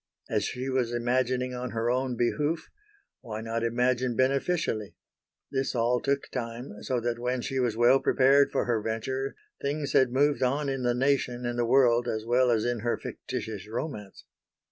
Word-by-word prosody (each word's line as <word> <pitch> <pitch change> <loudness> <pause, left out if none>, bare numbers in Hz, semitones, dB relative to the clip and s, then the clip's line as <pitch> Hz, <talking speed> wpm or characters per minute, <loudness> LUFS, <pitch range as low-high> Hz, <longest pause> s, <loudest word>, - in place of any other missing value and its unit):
As - - +1
she 125 +1 -4
was 130 -3 0
imagining 125 +1 0
on 125 0 -4
her 115 +1 0
own 130 -1 -1
behoof, 150 +7 -1 0.5
why 110 -2 -6
not 115 +1 -2
imagine 125 +1 +1
beneficially? 130 - 0 0.6
This 135 -1 -1
all 120 +1 +2
took 140 +2 -1
time, 115 -2 -5
so 130 -2 -1
that 120 0 -2
when 125 +1 -1
she 135 +2 -2
was 120 -3 0
well 120 +3 +5
prepared 135 +2 +4
for - - 0
her 115 -3 0
venture 130 +5 -3 0.3
things 145 0 -2
had 130 -2 +4
moved 140 +2 +2
on 140 +3 +1
in 135 -1 -2
the 120 -1 +1
nation 125 -2 0
and 120 0 -2
the 120 - +2
world 120 -2 +4
as 110 0 -2
well 125 +2 +3
as 115 -2 +2
in 120 -1 0
her 120 +2 -1
fictitious 105 -2 -6
romance. 110 -3 -6
125 Hz, 175 wpm, -28 LUFS, 115-135 Hz, 0.6 s, well